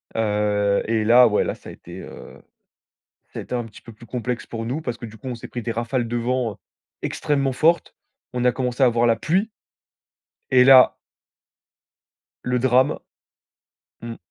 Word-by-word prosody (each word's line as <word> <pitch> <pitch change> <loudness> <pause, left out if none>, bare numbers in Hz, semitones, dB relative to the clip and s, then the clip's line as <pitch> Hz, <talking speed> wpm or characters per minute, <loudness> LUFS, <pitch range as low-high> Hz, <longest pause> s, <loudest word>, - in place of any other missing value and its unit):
Heu 105 -2 +1
et 110 -1 0
là, 120 +3 +6
ouais. 105 - +1
Là, - - -3
ça - - -13
a - - -8
été, 90 +2 -11
heu, - - -12 0.9
ça - - -7
a - - -6
été - - -7
un 120 -1 -2
petit 110 -2 -14
peu 115 - -12
plus 115 +2 -16
complexe 120 0 -4
pour 115 -1 -6
nous, 130 +7 -3
parce 120 -6 -4
que 120 - -8
du 110 0 -12
coup, 120 +5 -9
on 125 - -4
s'est 115 - -10
pris 120 - -6
des 115 - -3
rafales 120 +1 -2
de 120 - -2
vent 120 -2 -2 0.4
extrêmement 140 -3 -1
fortes. 165 +6 +1 0.4
On 125 0 -2
a 125 - +4
commencé 125 0 -2
à - - +7
avoir 120 0 +2
la 115 -1 +3
pluie 190 - 0 1.0
et 125 -1 +6
là 130 0 +7 1.5
le 125 0 0
drame 130 +1 +2 1.0
mmh. 115 0 -7
120 Hz, 185 wpm, -22 LUFS, 115-130 Hz, 1.5 s, à